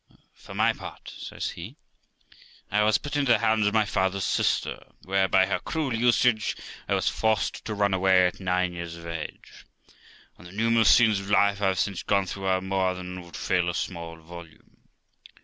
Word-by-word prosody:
For -, -, -12 dB
my -, -, +3 dB
part', -, -, -10 dB
says -, -, -5 dB
he, 100 Hz, +11 st, -9 dB, 1.0 s
'I 105 Hz, +2 st, +2 dB
was 110 Hz, 0 st, +4 dB
put 145 Hz, -, -6 dB
into 140 Hz, -4 st, +3 dB
the -, -, +4 dB
hands 110 Hz, -2 st, +2 dB
of 105 Hz, -, 0 dB
my 110 Hz, -1 st, +4 dB
father's 95 Hz, -1 st, 0 dB
sister, -, -, -1 dB
where, 95 Hz, +1 st, +1 dB
by 95 Hz, 0 st, +4 dB
her 95 Hz, -, -1 dB
cruel 155 Hz, -6 st, -2 dB
usage, 115 Hz, -1 st, +2 dB, 0.3 s
I -, -, +2 dB
was -, -, -1 dB
forced 110 Hz, -2 st, 0 dB
to 105 Hz, -, -3 dB
run 100 Hz, -1 st, +1 dB
away 95 Hz, -1 st, +4 dB
at 90 Hz, -, -2 dB
nine 90 Hz, -1 st, 0 dB
years 85 Hz, -1 st, -6 dB
of 85 Hz, 0 st, -11 dB
age; 85 Hz, -2 st, -8 dB, 0.8 s
and 90 Hz, -, -12 dB
the 90 Hz, -, -13 dB
numerous 115 Hz, +1 st, +3 dB
scenes 110 Hz, -4 st, +5 dB
of 100 Hz, 0 st, -8 dB
life 100 Hz, 0 st, +3 dB
I 100 Hz, -, +2 dB
have 95 Hz, -1 st, 0 dB
since 95 Hz, 0 st, -1 dB
gone 100 Hz, -1 st, +1 dB
through 95 Hz, +1 st, -6 dB
are 95 Hz, -1 st, +1 dB
more 95 Hz, -1 st, 0 dB
than 90 Hz, 0 st, -7 dB
would 85 Hz, -1 st, -13 dB
fill 90 Hz, -1 st, 0 dB
a 85 Hz, -, -3 dB
small 85 Hz, -3 st, -4 dB
volume. 85 Hz, 0 st, -14 dB
95 Hz, 195 wpm, -26 LUFS, 90-110 Hz, 1.0 s, scenes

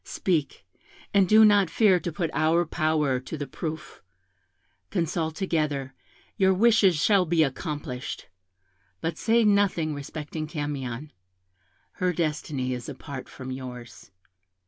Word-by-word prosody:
Speak, 155 Hz, -, -2 dB, 0.5 s
and 195 Hz, -3 st, +4 dB
do 220 Hz, 0 st, +8 dB
not 205 Hz, -4 st, +5 dB
fear 190 Hz, 0 st, +4 dB
to 175 Hz, -, -4 dB
put 165 Hz, -1 st, -2 dB
our 160 Hz, +3 st, +2 dB
power 155 Hz, -5 st, +1 dB
to 130 Hz, +5 st, -7 dB
the 145 Hz, -, -4 dB
proof; 155 Hz, +3 st, -6 dB, 0.9 s
consult 160 Hz, -1 st, -1 dB
together, 150 Hz, -7 st, -1 dB, 0.4 s
your 190 Hz, -2 st, +4 dB
wishes 210 Hz, -3 st, +5 dB
shall 190 Hz, +6 st, +3 dB
be 165 Hz, -1 st, +3 dB
accomplished; 145 Hz, -2 st, -4 dB, 0.7 s
but 165 Hz, 0 st, -2 dB
say 230 Hz, +1 st, +3 dB
nothing 200 Hz, -7 st, +2 dB
respecting 150 Hz, +2 st, -6 dB
Camion 145 Hz, -3 st, -4 dB, 0.9 s
her 180 Hz, 0 st, +2 dB
destiny 150 Hz, -5 st, -2 dB
is 125 Hz, +1 st, -6 dB
apart 140 Hz, -1 st, -8 dB
from 130 Hz, -1 st, -8 dB
yours. 125 Hz, -7 st, -9 dB
155 Hz, 125 wpm, -26 LUFS, 140-180 Hz, 0.9 s, do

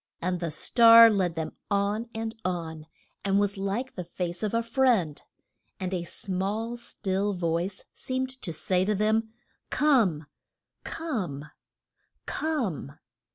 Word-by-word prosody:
And 180 Hz, 0 st, -1 dB
the 170 Hz, -1 st, -2 dB
star 230 Hz, -, +7 dB
led 185 Hz, -5 st, 0 dB
them 160 Hz, -1 st, -3 dB, 0.2 s
on 205 Hz, +3 st, 0 dB
and 225 Hz, 0 st, -3 dB
on, 160 Hz, -4 st, -4 dB, 0.4 s
and 195 Hz, 0 st, +2 dB
was 205 Hz, 0 st, +1 dB
like 200 Hz, +7 st, -3 dB
the 180 Hz, -, -5 dB
face 175 Hz, 0 st, -4 dB
of 215 Hz, -2 st, -1 dB
a 230 Hz, 0 st, +1 dB
friend. 230 Hz, -, +2 dB, 0.6 s
And 185 Hz, 0 st, -3 dB
a 175 Hz, -2 st, -2 dB
small, 205 Hz, +6 st, -2 dB
still 200 Hz, -3 st, -2 dB
voice 175 Hz, +1 st, -2 dB
seemed 260 Hz, 0 st, -4 dB
to 170 Hz, -, -3 dB
say 180 Hz, +3 st, +1 dB
to 210 Hz, +2 st, +1 dB
them: 220 Hz, +2 st, +1 dB, 0.4 s
Come! 225 Hz, -, +3 dB, 0.6 s
Come! 180 Hz, -, -4 dB, 0.7 s
Come! 235 Hz, -, -2 dB
200 Hz, 130 wpm, -27 LUFS, 175-230 Hz, 0.7 s, star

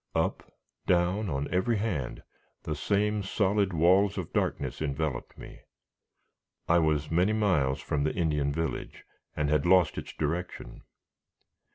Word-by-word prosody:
Up, -, -, -1 dB, 0.4 s
down, 90 Hz, +4 st, +2 dB
on 70 Hz, -1 st, -2 dB
every 100 Hz, +5 st, +1 dB
hand, 90 Hz, -, -3 dB, 0.4 s
the 80 Hz, -, -3 dB
same 105 Hz, +6 st, 0 dB
solid 100 Hz, 0 st, +1 dB
walls 95 Hz, +5 st, +3 dB
of 90 Hz, -4 st, -5 dB
darkness -, -, -1 dB
enveloped 75 Hz, -3 st, -3 dB
me. -, -, -11 dB, 1.1 s
I 85 Hz, +1 st, +4 dB
was 75 Hz, -2 st, 0 dB
many 90 Hz, +6 st, +3 dB
miles 90 Hz, -12 st, +1 dB
from 70 Hz, -, -1 dB
the 75 Hz, -, -1 dB
Indian 75 Hz, -5 st, 0 dB
village, 80 Hz, +2 st, -4 dB, 0.3 s
and 75 Hz, -1 st, 0 dB
had 75 Hz, -1 st, +2 dB
lost 90 Hz, -3 st, +4 dB
its -, -, -8 dB
direction. 85 Hz, +4 st, -4 dB
85 Hz, 135 wpm, -28 LUFS, 75-100 Hz, 1.1 s, I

